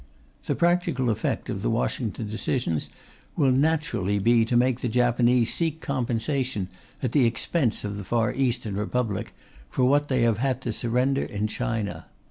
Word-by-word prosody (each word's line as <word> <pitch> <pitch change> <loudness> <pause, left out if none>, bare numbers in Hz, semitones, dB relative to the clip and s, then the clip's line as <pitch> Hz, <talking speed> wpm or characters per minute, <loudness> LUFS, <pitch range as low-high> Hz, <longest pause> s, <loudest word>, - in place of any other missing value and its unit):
The - - 0
practical 170 -8 +2
effect 105 - -2
of - - -3
the - - 0
Washington 110 - -1
decisions 105 - -2 0.5
will 135 -3 +3
naturally 130 - +1
be 115 +3 +4
to 120 +1 +1
make 125 0 +2
the 125 - -2
Japanese 120 0 +3
seek 160 -2 -1
compensation, 125 - -1 0.3
at 125 - 0
the 130 -4 +4
expense 120 +2 0
of 105 -1 -4
the 100 - -5
Far 115 +4 0
Eastern 120 -5 -1
Republic, 105 0 -2 0.4
for 125 - +1
what 145 +3 +3
they 130 -4 +1
have 115 -2 +2
had 130 0 0
to 115 - -2
surrender 125 +4 +1
in 105 +1 -2
China. 110 -6 -3
120 Hz, 160 wpm, -26 LUFS, 110-130 Hz, 0.5 s, be